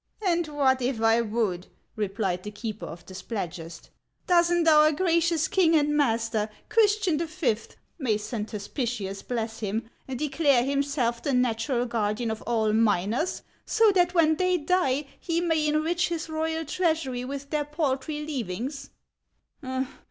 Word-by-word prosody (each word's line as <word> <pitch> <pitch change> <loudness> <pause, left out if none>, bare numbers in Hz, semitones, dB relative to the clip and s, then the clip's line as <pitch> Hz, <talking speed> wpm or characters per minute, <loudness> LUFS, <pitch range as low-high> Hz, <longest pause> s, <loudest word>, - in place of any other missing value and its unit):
" - - -37
And 345 -2 +2
what 270 -3 +2
if 245 -1 -1
I 225 +1 +4
would? 210 -5 -1
" - - -44
replied 195 -3 -1
the 210 - -6
keeper 210 +1 -6
of 170 +1 -10
the 185 - -11
Splad 190 -2 -4
gest. 165 0 -10 0.3
"Does 345 -1 +4
n't 345 -1 +2
our 305 -1 +7
gracious 335 -1 +2
king 335 -4 +3
and 295 -1 +2
master, 225 -6 +1 0.2
Christian 420 -7 +3
V., 320 -8 0 0.2
— - - -44
may 230 -7 +1
Saint 215 0 -5
Hospitius 210 -2 -3
bless 225 -2 -4
him! 225 +2 -3
— - - -39
declare 275 -1 +2
himself 275 -3 0
the 280 - -1
natural 245 0 +1
guardian 225 0 -1
of 220 - -5
all 220 -2 +1
miners, 220 - +1 0.2
so 445 -1 +4
that 360 -1 +2
when 315 -2 +4
they 365 0 +2
die 300 -4 +1 0.2
lie 335 0 +2
may 320 -3 +1
enrich 320 +4 +1
his 335 -1 -3
royal 320 +1 -2
treasury 315 -6 -1
with 280 +2 -6
their 300 -1 0
paltry 300 0 -2
leavings 270 +1 -4
270 Hz, 160 wpm, -26 LUFS, 225-320 Hz, 0.3 s, our